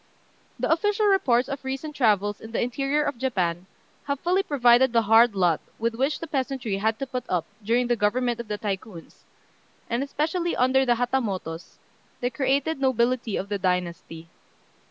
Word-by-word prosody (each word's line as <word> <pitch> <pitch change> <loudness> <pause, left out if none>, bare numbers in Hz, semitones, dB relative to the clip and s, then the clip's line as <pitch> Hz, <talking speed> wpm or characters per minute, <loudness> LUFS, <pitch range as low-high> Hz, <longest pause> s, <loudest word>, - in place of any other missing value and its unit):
] - - -36
The - - +1
official 415 +5 +2
reports 270 -12 +3
of 275 -1 -5
recent 270 +3 -5
travels 205 -5 +1
in 225 +1 -10
the - - 0
interior 275 +5 0
of 285 -5 -3
Japan 185 -8 -1 0.4
have 280 -1 -2
fully 365 +3 +2
proved 285 -10 -6 0.3
the 230 -1 +3
hard 225 +1 +5
lot 175 -4 +2 0.2
with 230 +1 -1
which 270 +6 -1
the - - -5
peasantry 265 -8 -2
had 220 +2 0
to 275 - -3
put 255 -2 -4
up 175 -3 0 0.2
during 235 +4 +2
the 240 0 +1
government 235 +3 0
of 235 - -6
the 210 0 -3
Tycoons, 195 -4 -6 0.7
and 235 +2 0
especially 320 +5 -1
under 260 +1 +3
the 240 - +4
Hatamotos, 205 -9 -3 0.4
the 245 0 -1
created 275 +4 0
nobility 245 -3 +1
of 195 - -4
the 205 -1 -3
dynasty. 175 -3 -3
240 Hz, 175 wpm, -25 LUFS, 205-275 Hz, 0.7 s, hard